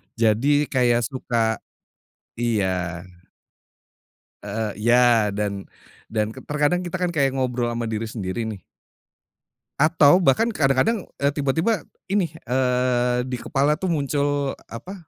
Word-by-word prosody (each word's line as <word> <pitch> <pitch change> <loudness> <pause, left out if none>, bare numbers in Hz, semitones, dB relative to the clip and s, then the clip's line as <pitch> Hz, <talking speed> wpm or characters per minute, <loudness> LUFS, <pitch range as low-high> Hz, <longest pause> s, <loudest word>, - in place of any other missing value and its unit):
jadi, 115 +4 +2 0.2
kayak 120 -2 +3
suka 115 -4 -1 0.8
iya. 110 -6 0 1.7
Heeh 105 +1 -3
iya. 120 -2 +4
Dan 100 -2 -3 0.5
dan, 110 -1 0
terkadang 145 +7 -1
kita 175 - -3
kan, 180 -1 +1
kayak, 140 -4 +2
ngobrol 125 -2 -1
sama 115 0 -3
diri 110 +1 -2
sendiri 110 0 -4
nih 105 -4 -7 1.1
atau, 155 +3 +5
bahkan 175 +9 +3
kadang-kadang, 145 - +2 0.2
eee, 140 0 +2
tiba-tiba, 160 +8 0 0.2
ini, 190 -4 0 0.2
eee, 125 -1 +1
di 130 - -4
kepala 140 +4 +1
tuh 185 +3 -3
muncul, 145 -2 0 0.2
apa, 175 +12 -8
125 Hz, 115 wpm, -23 LUFS, 115-145 Hz, 1.7 s, atau